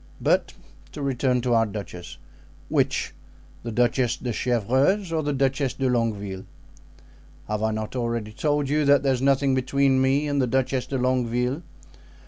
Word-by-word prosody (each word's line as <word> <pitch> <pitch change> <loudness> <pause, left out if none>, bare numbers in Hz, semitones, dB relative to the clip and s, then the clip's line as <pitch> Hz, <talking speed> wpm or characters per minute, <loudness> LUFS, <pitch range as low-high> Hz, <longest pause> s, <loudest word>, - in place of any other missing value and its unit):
But - - +1 0.4
to 150 - -6
return 130 -2 +1
to 120 0 0
our 115 -1 +3
duchess." 90 -5 -8 0.5
"Which—the 115 - -3
Duchess 120 +1 +1
de 120 -2 -4
Chevreuse 130 - +1
or 160 - +1
the 145 -1 -1
Duchess 135 0 0
de 135 - 0
Longueville?" 105 -6 -1 1.0
"Have 105 0 -2
I 110 - +1
not 110 +2 -4
already 115 -3 -2
told 145 +4 0
you 150 +2 +1
that 140 -1 +4
there 135 -1 +3
is 125 - -2
nothing 135 0 +3
between 130 +1 +2
me 135 +3 +2
and 145 -1 +1
the 130 - +1
Duchess 130 +1 0
de 135 - -2
Longueville? 125 +2 0
130 Hz, 155 wpm, -24 LUFS, 115-140 Hz, 1.0 s, that